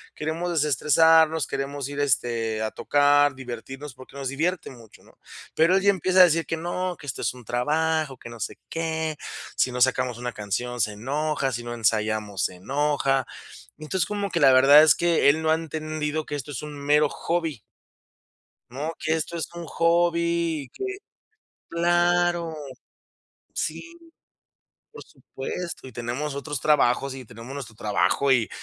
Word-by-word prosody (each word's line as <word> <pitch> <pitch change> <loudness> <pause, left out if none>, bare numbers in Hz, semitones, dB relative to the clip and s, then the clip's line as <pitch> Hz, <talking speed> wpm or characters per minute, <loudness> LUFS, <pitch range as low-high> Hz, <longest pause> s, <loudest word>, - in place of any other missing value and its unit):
queremos 165 +3 -3
desestresarnos, 160 +1 +4
queremos 140 0 -4
ir, 145 0 -5
este, 115 -5 0
a 110 - -1
tocar, 145 0 +3
divertirnos", 135 +2 -8
porque 130 +1 -14
nos 135 -1 -4
divierte 165 +6 -1
mucho, 115 -4 -16
¿no? - - -22 0.4
Pero 165 +4 +4
él 195 - +3
ya 200 - +5
empieza 185 0 +1
a - - +12
decir 165 -1 +1
que: 165 - -2
"No, 175 +2 -3
que 145 - -11
esto 130 - -4
es - - 0
un 125 -3 -14
trabajo, 155 +3 0
que 120 - -10
no 115 -1 -10
sé 100 - -5
qué", 160 -2 -2 0.4
si 130 - +2
no 125 0 -4
sacamos 125 -2 +2
una 125 0 -4
canción, 120 +4 -3
se 105 - +1
enoja, 140 +4 -1
si 120 0 -4
no 120 0 -5
ensayamos 110 -3 0
se 90 - -3
enoja. 135 +3 0 0.5
Entonces, 175 +3 -1
como 205 -1 -2
que - - 0
la 135 -2 +6
verdad 140 +4 +8
es 155 - +6
que 170 -4 +3
él 155 +3 +2
no 160 - 0
ha - - +5
entendido 155 -1 -3
que 145 - -4
esto 145 +1 -6
es 130 - -5
un 150 -1 -7
mero 145 +1 +3
hobby 165 -8 -2 1.1
¿no? 150 +6 -4
Que 160 - 0
esto 165 +1 -3
es 165 - -3
un 170 -1 -7
hobby, 170 -1 +1
y - - -15
que 390 - -7 0.9
claro. 175 -1 +2 1.0
Sí, - - -3 1.1
por 455 - -11
supuesto. 135 +3 -7
Y - - -10
tenemos 120 +6 -4
otros 140 0 -4
trabajos, 140 -2 +2
y 130 -1 -8
tenemos 115 +5 -10
nuestro 120 -6 -8
trabajo, 110 +6 +1
y 120 -4 +3
145 Hz, 170 wpm, -25 LUFS, 125-160 Hz, 1.1 s, a